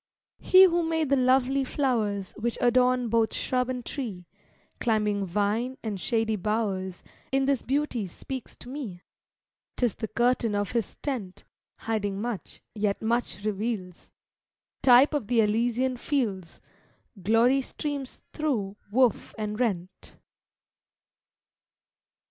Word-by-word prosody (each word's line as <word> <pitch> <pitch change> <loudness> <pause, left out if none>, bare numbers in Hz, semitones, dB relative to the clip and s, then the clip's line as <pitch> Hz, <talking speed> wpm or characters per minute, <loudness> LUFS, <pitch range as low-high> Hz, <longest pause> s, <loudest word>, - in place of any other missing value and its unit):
He 375 0 +7
who 345 -2 +4
made 320 -3 0
the - - +6
lovely 260 +1 +3
flowers 220 -8 -1
Which 235 +2 -2
adorn 250 0 +3
both 225 0 +1
shrub 250 -1 0
and 250 -2 -4
tree, 210 - -5 0.5
Climbing 210 -3 +1
vine, 210 +7 0
and 205 -4 -4
shady 225 -1 0
bowers, 190 -3 -2 0.3
In 270 0 +2
this 275 -3 +1
beauty 265 -5 -1
speaks 260 +8 -7
to 245 - -12
me: 240 -11 -6 0.7
'Tis 245 -4 +1
the 220 - -5
curtain 235 0 +1
of 205 -2 -1
His 235 -4 -2
tent, 230 -10 -4 0.4
Hiding 205 -3 -2
much, 230 -2 -5
yet 205 -2 0
much 230 -2 -1
reveals, 205 -4 -3 0.7
Type 255 +3 +6
of 280 -8 -1
the 240 0 +2
Elysian 240 +4 +1
fields; 215 - -2 0.6
Glory 230 +7 +4
streams 280 0 -5
thro' 220 -10 -1
woof 245 +1 +2
and 210 0 -3
rent. 190 -6 -3
235 Hz, 120 wpm, -27 LUFS, 205-260 Hz, 0.7 s, He